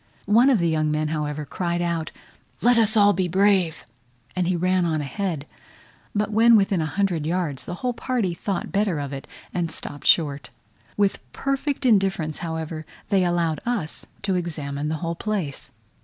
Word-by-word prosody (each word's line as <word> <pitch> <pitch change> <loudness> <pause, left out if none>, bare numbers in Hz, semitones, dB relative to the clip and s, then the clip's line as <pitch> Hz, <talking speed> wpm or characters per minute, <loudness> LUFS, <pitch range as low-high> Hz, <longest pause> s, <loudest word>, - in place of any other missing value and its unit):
One 230 +6 +5
of 260 - +5
the 170 -3 +1
young 155 -1 +1
men, 155 0 0
however, 150 -1 -2
cried 175 +3 -2
out, 170 -2 -1 0.5
"Let 245 +1 +6
us 220 0 +3
all 205 -1 +6
be 185 0 0
brave," 190 -2 +2 0.5
and 185 -1 +1
ran 185 +1 +2
on 160 -2 0
ahead; 155 0 -3 0.7
but 210 +1 0
when 230 +2 +6
within 195 -4 +3
a 155 - -1
hundred 185 -3 0
yards, 165 -5 -1
the 175 - -5
whole 250 - +1
party 230 -7 -1
thought 190 +2 -3
better 200 -4 +1
of 140 -1 -4
it, 135 - -7 0.3
and 175 -2 -1
stopped 145 -2 -6
short. 145 -4 +3 0.5
With 200 -1 +2
perfect 275 0 -1
indifference, 190 -9 +2
however, 160 -1 -4 0.3
they 195 -2 +3
allowed 170 -3 0
us 225 -10 -2 0.2
to 195 -1 +1
examine 150 -5 -2
the 160 - -1
whole 165 - -1
place. 175 -6 -3
175 Hz, 170 wpm, -24 LUFS, 155-205 Hz, 0.7 s, Let